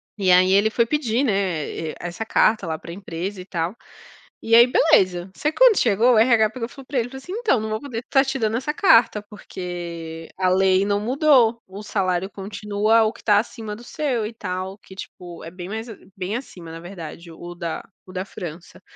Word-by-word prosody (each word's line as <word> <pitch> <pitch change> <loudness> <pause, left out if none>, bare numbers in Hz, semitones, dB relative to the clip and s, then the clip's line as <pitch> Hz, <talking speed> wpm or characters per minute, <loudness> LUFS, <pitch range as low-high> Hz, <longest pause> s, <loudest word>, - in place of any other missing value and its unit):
E 195 -3 +2
aí 185 +1 +5
ele 200 +3 +4
foi 230 +1 +2
pedir, 255 -2 0
né, 185 - -1
eh, - - -7
essa 175 +5 -5
carta 215 -3 +2
lá 160 -1 -2
para 170 - -10
a - - -6
empresa 185 +1 -6
e - - -11
tal. 175 +1 -3 0.7
E 225 - -1
aí, 235 +1 +8
beleza. 190 - +3
Só 300 - 0
que - - -17
quando - - +6
chegou, 230 +2 +4
o - - +5
RH 225 -2 +4
pegou, 230 0 -5
falou 270 +1 -13
pra 275 - -1
ele, 235 - -1
falou, 265 - -9
assim: 305 +7 -11
"Então, 440 - +1
não 220 - -4
vou 215 0 -2
poder 255 -6 -5
estar 270 +3 +2
te 270 0 -2
dando 220 0 0
essa 295 +4 -2
carta, 230 - +4
porque 170 -5 -7
a 185 -1 +2
lei 190 +1 +3
não 205 0 +1
mudou. 245 -1 +3
O 195 +2 -9
salário 190 -3 -1
continua 210 +2 +1
o 220 +1 0
que - - -16
está 205 -2 +4
acima 220 -1 -5
do 235 - -13
seu 255 -6 -2
e 225 - -9
tal", 190 -2 -5
que 190 - -15
tipo 175 -2 -10
é - - -6
bem 180 0 -8
mais 220 +3 -5
a 220 - -8 0.2
bem 190 +3 -3
acima, 175 -10 -10
na 165 - -7
verdade, 170 -2 -9
o 175 +2 -9
da 170 -2 -4 0.2
o 185 - -13
da 185 0 -3
França. 170 -1 -9
205 Hz, 220 wpm, -22 LUFS, 180-230 Hz, 0.7 s, aí